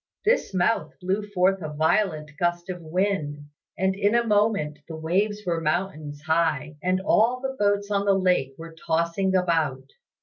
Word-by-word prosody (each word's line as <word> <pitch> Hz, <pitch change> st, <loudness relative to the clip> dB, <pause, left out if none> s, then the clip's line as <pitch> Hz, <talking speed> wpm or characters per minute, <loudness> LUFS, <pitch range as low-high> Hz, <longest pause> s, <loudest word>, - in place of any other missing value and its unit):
This 470 Hz, +4 st, +2 dB
mouth 190 Hz, +4 st, 0 dB
blew 190 Hz, +3 st, -1 dB
forth 195 Hz, -2 st, +1 dB
a 155 Hz, -2 st, -5 dB
violent 155 Hz, 0 st, +1 dB
gust 175 Hz, +1 st, -1 dB
of 180 Hz, -1 st, -7 dB
wind, 165 Hz, -3 st, -1 dB, 0.4 s
and 190 Hz, 0 st, +1 dB
in 205 Hz, +3 st, +2 dB
a 235 Hz, 0 st, +3 dB
moment 205 Hz, -9 st, +1 dB
the 165 Hz, -, -7 dB
waves 200 Hz, +7 st, -1 dB
were 170 Hz, -2 st, -1 dB
mountains 155 Hz, -3 st, -2 dB
high 155 Hz, -2 st, 0 dB
and 185 Hz, +1 st, +1 dB
all 230 Hz, +5 st, +3 dB
the 265 Hz, 0 st, -4 dB
boats 205 Hz, 0 st, +1 dB
on 200 Hz, 0 st, +1 dB
the 195 Hz, -1 st, +4 dB
lake 180 Hz, -8 st, +1 dB
were 165 Hz, 0 st, -9 dB
tossing 170 Hz, +4 st, 0 dB
about. 155 Hz, -7 st, 0 dB
180 Hz, 165 wpm, -25 LUFS, 160-200 Hz, 0.4 s, the